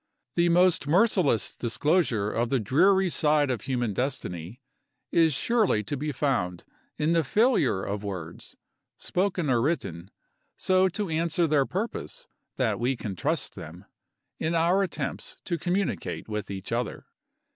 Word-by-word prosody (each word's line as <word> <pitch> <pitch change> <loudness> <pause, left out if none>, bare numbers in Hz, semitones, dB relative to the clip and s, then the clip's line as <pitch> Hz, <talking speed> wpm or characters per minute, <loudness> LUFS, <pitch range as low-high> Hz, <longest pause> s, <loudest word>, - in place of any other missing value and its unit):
The 170 +2 +3
most 175 -3 +3
merciless 180 - +2
disclosure 120 - +1
of 115 +1 -1
the 135 - +1
dreary 190 - +3
side 150 -4 +2
of 120 - -2
human 120 -5 -1
destiny 110 - -4 0.5
is 165 -1 +4
surely 200 - +1
to 110 - -3
be 150 +2 -3
found 120 - -1 0.3
in 155 +2 +1
the 165 -1 +3
failure 150 - +2
of 100 +1 -4
words, 90 -5 -7 0.4
spoken 180 -3 -1
or 120 -3 +2
written, 95 - -2 0.5
so 185 0 +3
to 190 +2 -3
answer 165 +1 +1
their 145 -4 +2
purpose 230 - -4 0.3
that 110 -6 0
we 125 +3 +1
can 105 -5 -5
trust - - -2
them, 85 +5 -10 0.5
in 165 +2 -1
our 170 +4 +3
attempts 195 - -4
to 170 -2 -2
communicate 180 +4 -2
with 105 -1 -4
each 95 -2 -6
other. - - -3
145 Hz, 145 wpm, -27 LUFS, 110-175 Hz, 0.5 s, is